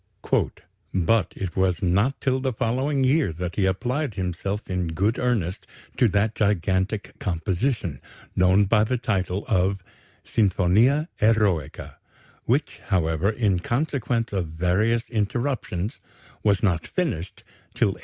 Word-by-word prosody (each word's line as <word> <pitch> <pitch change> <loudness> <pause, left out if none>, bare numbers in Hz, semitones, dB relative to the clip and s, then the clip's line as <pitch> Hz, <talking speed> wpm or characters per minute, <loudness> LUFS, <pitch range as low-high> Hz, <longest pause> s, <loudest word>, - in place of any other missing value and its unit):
"But 95 +1 +2
it 95 -3 -5
was 95 -2 +1
not 100 +10 +2
till 130 -1 +1
the 130 -1 -1
following 130 +4 0
year 135 - +3
that 85 +1 -5
he 95 -2 +2
applied 125 +6 -1
himself 95 +3 -3
in 90 -2 -1
good 100 +8 0
earnest 110 -8 -1 0.3
to 120 - +5
that 105 +2 +1
gigantic 100 +1 0
composition, 95 - -1 0.3
known 95 +2 +4
by 105 +2 +3
the 125 +4 0
title 100 -5 -1
of 95 -1 +1 0.4
Sinfonia 110 - +3
Eroica, 105 -9 +1 0.5
which, - - 0
however, 80 0 +1
in 105 -5 +1
consequence 120 - -1
of 95 -4 -1
various 95 +9 +1
interruptions, 110 -3 -2 0.4
was 100 -3 +2
not 85 -5 +1
finished 105 - -3 0.3
till - - +3
1804.... - - -6
100 Hz, 125 wpm, -24 LUFS, 90-120 Hz, 0.5 s, to